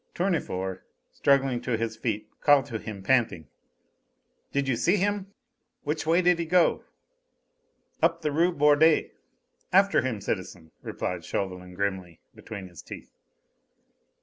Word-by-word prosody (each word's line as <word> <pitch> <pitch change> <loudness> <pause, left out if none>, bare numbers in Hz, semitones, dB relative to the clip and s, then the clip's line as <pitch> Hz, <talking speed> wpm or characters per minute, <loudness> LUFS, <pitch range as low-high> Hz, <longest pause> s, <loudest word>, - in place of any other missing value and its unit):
Tournefort, 95 - -2 0.3
struggling 135 -3 +2
to 125 -3 -1
his 115 0 -3
feet, 110 -2 -3
called 145 -2 +5
to 115 -5 -5
him, 105 -3 -8
panting: 110 -9 +1 1.1
"Did 140 -1 0
you 130 - +1
see 175 - +2
him? 200 0 -1 0.5
Which 155 +1 -3
way 170 +3 +3
did 175 -1 +4
he 170 - -1
go?" 175 +1 +3 1.2
"Up 165 0 +2
the 150 - 0
Rue 170 +5 +3
Bordet. 150 0 +4 0.6
After 195 +2 +4
him, 120 -4 -2
citizen!" 90 -5 -5
replied 90 -2 -4
Chauvelin 90 0 -4
grimly, 95 -3 -3
between 100 -4 -8
his 85 -2 -12
teeth. - - -11
130 Hz, 130 wpm, -27 LUFS, -, 1.2 s, called